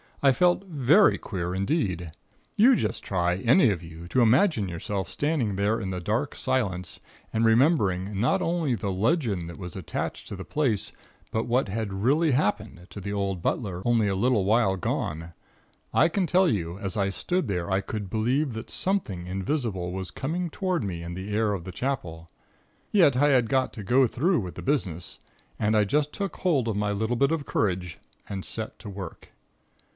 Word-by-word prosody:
I 135 - +7
felt 180 +6 +2
very 160 - +4
queer 90 -3 -4
indeed. 95 - -1 0.4
You 245 +5 +6
just - - -2
try, 90 -2 0
any 125 - +4
of 90 -4 -3
you, 85 0 -10
to 130 - +2
imagine 120 - +4
yourself 90 +2 -4
standing 145 -9 0
there 100 +3 +1
in 95 -4 -4
the 90 -1 -3
dark 105 +6 -1
silence 100 -10 -2 0.3
and 110 - +1
remembering 105 - +2
not 120 - +2
only 165 -5 0
the 100 -1 -3
legend 100 - 0
that 85 - -9
was 90 -3 -8
attached 95 -5 -4
to - - -6
the 95 - -8
place, 130 -10 0 0.4
but 110 +1 -1
what 120 -1 +1
had 105 0 -3
really 140 +11 +2
happened 105 - -1
to - - -7
the 100 +2 -4
old 100 -3 -2
butler 90 -2 -2
only 115 -3 +3
a 100 - 0
little 115 +1 +2
while 105 -2 +3
gone, 80 -2 -3 0.6
I - - +5
can 185 +3 0
tell 185 +2 +4
you, 85 - -1
as 100 -2 -4
I 100 -1 +1
stood 175 - -1
there, 90 -3 -2
I 95 +1 +2
could 105 0 -5
believe 125 +6 0
that 110 +1 -7
something 140 - -1
invisible 95 - -2
was 95 -1 -5
coming 170 +6 -3
toward 185 - -1
me 90 -4 -4
in 85 +1 -6
the 95 +3 -6
air 105 -1 +2
of 95 -4 -4
the 95 - -7
Chapel. 90 -9 -4 0.6
Yet, 170 -10 +5
I 145 +3 +4
had 125 -5 +3
got 130 0 +1
to 110 - -7
go 125 +6 +4
through 165 - +1
with 90 -5 -5
the - - -7
business, 95 - -2 0.4
and 110 0 +2
I 105 - +5
just 145 +7 +1
took 200 -4 -4
hold 145 -10 +1
of 110 - -1
my 105 0 0
little 110 +4 -1
bit 140 +5 +2
of 160 -3 -1
courage 90 -5 -1 0.3
and 95 -2 -5
set 110 -1 -3
to 105 - -8
work. 95 -4 -8
110 Hz, 190 wpm, -26 LUFS, 95-135 Hz, 0.6 s, I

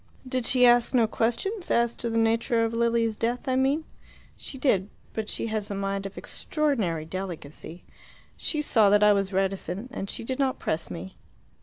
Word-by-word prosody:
"Did 255 -2 -1
she 250 0 +5
ask 240 +1 +5
no 235 -2 +5
questions 240 - -1
as 235 0 +2
to 235 - -3
the 230 - -1
nature 230 +1 +2
of 225 - -3
Lilia's 230 -1 +1
death, 240 +4 -2
I 260 - +1
mean?" 270 +4 +2 0.5
"She 270 - -7
did. 210 -8 +2 0.2
But 220 -1 -3
she - - -2
has 210 -2 -1
a 200 - -3
mind 195 0 -2
of 195 - -13
extraordinary 220 - -1
delicacy. 170 -2 -7 0.5
She 300 -2 -2
saw 220 -7 +4
that 205 +1 +5
I 210 0 +7
was 195 -1 0
reticent, 195 +4 -2
and 195 - -4
she - - -5
did 260 +4 -3
not 265 -2 +1
press 160 +1 -2
me. 90 +2 -8
225 Hz, 185 wpm, -26 LUFS, 195-250 Hz, 0.5 s, I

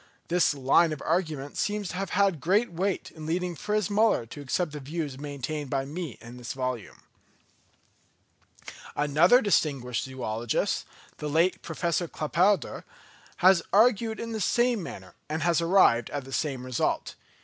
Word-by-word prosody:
This 170 -3 +3
line 140 +5 +4
of 150 - -7
argument 155 -5 -1
seems 205 -2 -1
to - - -6
have 195 -1 -3
had 195 -7 +2
great 200 +5 +2
weight 190 +2 -2
in 155 -1 -9
leading 175 +1 -1
Fritz 210 +4 -1
Müller 210 - +2
to 145 - -8
accept 155 +4 -1
the 150 - -6
views 145 -1 -5
maintained 145 0 -5
by 135 0 -1
me 155 -2 -6
in 120 +1 -11
this 120 -1 -6
volume. 130 -4 -4 1.9
Another 155 - +5
distinguished 140 - +1
zoologist, 120 -3 -2 0.3
the 150 - -4
late 165 +5 +2
Professor 170 +1 -1
Claparède, 180 +7 +1 0.6
has 185 -2 +7
argued 220 +1 +3
in 230 0 -5
the 220 -1 -3
same 240 +2 +2
manner, 95 - -9 0.2
and 155 0 -2
has 170 -1 +2
arrived 165 -9 +4
at 145 -2 -4
the 135 +1 -10
same 135 -5 -2
result. 130 -2 -1
160 Hz, 150 wpm, -27 LUFS, 135-190 Hz, 1.9 s, has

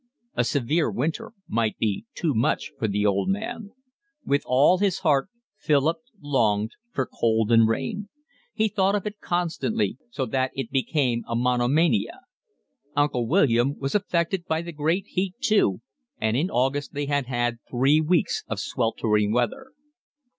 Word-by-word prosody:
A 120 - +1
severe 140 +5 +1
winter 155 - -2 0.2
might 110 -1 0
be 110 0 -2
too 160 -4 0
much 110 - 0
for - - 0
the 105 0 0
old 100 - +1
man. 220 +2 -3 0.6
With 140 0 +2
all 140 +8 +4
his 195 -2 +1
heart 150 -1 +2 0.3
Philip 150 +2 +2 0.2
longed 110 -7 +1 0.2
for 130 - -1
cold 115 -1 0
and 115 -1 +6
rain. 135 - -2 0.4
He 220 -1 +1
thought 200 -1 +1
of 205 - -2
it 210 0 -5
constantly, 180 +6 -1
so 140 - -2
that 130 +2 0
it 135 -3 -4
became 130 -3 0
a 115 - -2
monomania. 125 +1 +1 0.7
Uncle 145 -5 +1
William 135 -4 +3
was 135 0 -3
affected 180 -3 0
by 160 +1 0
the 170 - -6
great 160 +5 0
heat 185 0 -2
too, 210 - +2 0.4
and 110 0 0
in 160 +9 +1
August 135 +2 -1
they 145 0 -1
had 120 -4 -1
three 135 +5 +3
weeks 165 +2 +1
of - - -3
sweltering 105 -2 0
weather. 260 - -1
140 Hz, 150 wpm, -25 LUFS, 120-175 Hz, 0.7 s, and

